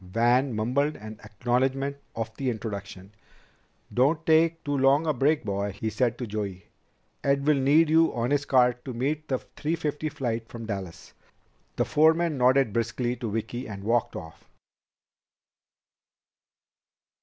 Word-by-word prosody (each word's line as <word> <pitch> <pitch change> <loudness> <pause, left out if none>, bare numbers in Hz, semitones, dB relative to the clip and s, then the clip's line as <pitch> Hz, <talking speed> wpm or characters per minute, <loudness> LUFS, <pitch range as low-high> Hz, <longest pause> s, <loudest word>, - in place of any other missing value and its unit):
Van 120 +8 +2
mumbled 130 +8 0
an 110 0 -10
acknowledgment 130 +6 -1 0.2
of 110 0 -4
the 135 +1 -1
introduction. 100 -4 -6 0.8
"Don't 145 +6 +2
take 165 +1 +3
too 145 0 -1
long 135 +3 +3
a 155 - +1
break, 145 +4 +2
boy," 100 0 -2
he 110 +2 -3
said 120 +2 0
to 125 - -4
Joey. 100 -4 -5 0.6
"Ed 140 0 +1
will 150 -2 +3
need 145 +5 +4
you 160 +1 +4
on 120 +2 -1
his 145 -1 +2
cart 125 -3 +3
to 130 -3 -5
meet 150 +5 -2
the 130 - 0
three 155 +5 -4
fifty 150 -1 -3
flight 115 -5 -3
from 115 -2 -8
Dallas." 95 -5 -6 0.6
The - - +1
foreman 160 +1 +3
nodded 130 -3 +3
briskly 120 +1 -1
to 115 - -4
Vicki 115 +4 -4
and 100 -2 -7
walked 115 +2 0
off. 80 0 -10
125 Hz, 145 wpm, -26 LUFS, 110-145 Hz, 0.8 s, need